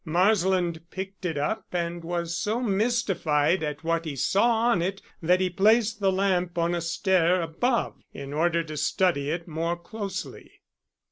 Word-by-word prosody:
Marsland 180 Hz, -1 st, +2 dB
picked 190 Hz, 0 st, -7 dB
it 165 Hz, -4 st, -1 dB
up 150 Hz, +10 st, -2 dB
and 170 Hz, -1 st, -3 dB
was 170 Hz, 0 st, -2 dB
so 215 Hz, +5 st, -1 dB
mystified 195 Hz, -8 st, +1 dB
at 150 Hz, -1 st, -4 dB
what 165 Hz, 0 st, 0 dB
he 155 Hz, -4 st, -5 dB
saw 195 Hz, -, +2 dB, 0.2 s
on 195 Hz, -8 st, +2 dB
it 190 Hz, +3 st, -2 dB, 0.2 s
that 180 Hz, +3 st, +3 dB
he 185 Hz, -, +2 dB
placed 215 Hz, +4 st, +3 dB
the 195 Hz, -2 st, +2 dB
lamp 185 Hz, -2 st, 0 dB
on 170 Hz, +1 st, +1 dB
a 175 Hz, -, -1 dB
stair 180 Hz, +1 st, +2 dB
above 180 Hz, +10 st, -1 dB
in 140 Hz, 0 st, -8 dB
order 170 Hz, +2 st, +1 dB
to 155 Hz, -1 st, -7 dB
study 150 Hz, -1 st, +1 dB
it 170 Hz, +2 st, -3 dB
more 165 Hz, +2 st, -2 dB
closely. 195 Hz, +1 st, -7 dB
175 Hz, 160 wpm, -26 LUFS, 165-195 Hz, 0.2 s, that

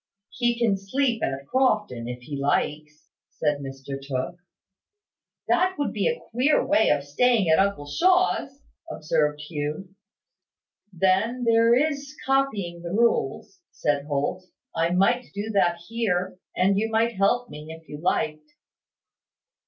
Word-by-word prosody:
"He 240 Hz, -1 st, 0 dB
can 225 Hz, -5 st, +2 dB
sleep 235 Hz, +3 st, 0 dB
at 135 Hz, 0 st, -2 dB
Crofton, 210 Hz, -, 0 dB
if 125 Hz, 0 st, -6 dB
he 145 Hz, +2 st, -6 dB
likes," 150 Hz, +2 st, -2 dB, 0.2 s
said 150 Hz, -2 st, -1 dB
Mr 135 Hz, 0 st, -7 dB
Tooke. 135 Hz, +5 st, -4 dB, 1.1 s
"That 370 Hz, +1 st, +2 dB
would 290 Hz, -, -1 dB
be -, -, 0 dB
a 480 Hz, 0 st, -1 dB
queer 260 Hz, +6 st, +2 dB
way 265 Hz, -4 st, +3 dB
of 145 Hz, -1 st, +2 dB
staying 210 Hz, -, +2 dB
at 160 Hz, -, +5 dB
uncle 195 Hz, -6 st, +1 dB
Shaw's," 330 Hz, -, +1 dB, 0.3 s
observed 150 Hz, -, 0 dB
Hugh. 150 Hz, +4 st, -4 dB, 1.0 s
"Then 195 Hz, +7 st, +1 dB
there 230 Hz, 0 st, +5 dB
is 285 Hz, +1 st, -1 dB
copying 215 Hz, -11 st, 0 dB
the 170 Hz, -, -6 dB
rules," 235 Hz, -, 0 dB
said 145 Hz, -1 st, -1 dB
Holt. 145 Hz, +5 st, -2 dB, 0.3 s
"I 165 Hz, +1 st, +1 dB
might 195 Hz, +8 st, +2 dB
do 210 Hz, +2 st, -3 dB
that 175 Hz, -4 st, +2 dB
here; 185 Hz, -6 st, -1 dB, 0.2 s
and 195 Hz, +2 st, +3 dB
you 220 Hz, +1 st, -1 dB
might 225 Hz, +1 st, +1 dB
help 220 Hz, +6 st, +1 dB
me, 150 Hz, +1 st, -9 dB
if 160 Hz, -1 st, -12 dB
you 150 Hz, +1 st, -8 dB
liked." 155 Hz, -3 st, -1 dB
190 Hz, 135 wpm, -25 LUFS, 150-240 Hz, 1.1 s, at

